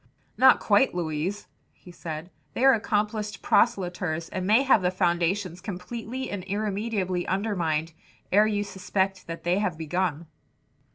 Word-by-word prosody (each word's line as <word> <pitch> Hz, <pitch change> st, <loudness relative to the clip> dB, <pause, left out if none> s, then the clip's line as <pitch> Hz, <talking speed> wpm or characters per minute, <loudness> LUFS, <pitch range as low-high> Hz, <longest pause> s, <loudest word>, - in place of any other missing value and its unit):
"Not -, -, +6 dB
quite, 265 Hz, -9 st, +3 dB
Louise," 170 Hz, +4 st, -2 dB, 0.3 s
he 180 Hz, -, -15 dB
said, 165 Hz, 0 st, -7 dB, 0.2 s
"they 255 Hz, -, +2 dB
are 270 Hz, -, +8 dB
accomplished 210 Hz, -1 st, -1 dB
proselyters 180 Hz, -7 st, +1 dB
and 185 Hz, 0 st, -3 dB
may 220 Hz, +6 st, +5 dB
have 265 Hz, -6 st, +4 dB
the 180 Hz, -, +2 dB
foundations 180 Hz, +1 st, 0 dB
completely 225 Hz, +7 st, -5 dB
and 200 Hz, -3 st, -4 dB
irremediably 200 Hz, -2 st, -2 dB
undermined 170 Hz, -5 st, -1 dB, 0.4 s
ere 210 Hz, +3 st, +5 dB
you 205 Hz, -1 st, 0 dB
suspect 190 Hz, -1 st, -2 dB
that 165 Hz, 0 st, -7 dB
they 175 Hz, +3 st, +1 dB
have 185 Hz, -6 st, -1 dB
begun." 165 Hz, 0 st, -2 dB
190 Hz, 135 wpm, -26 LUFS, 175-210 Hz, 0.4 s, are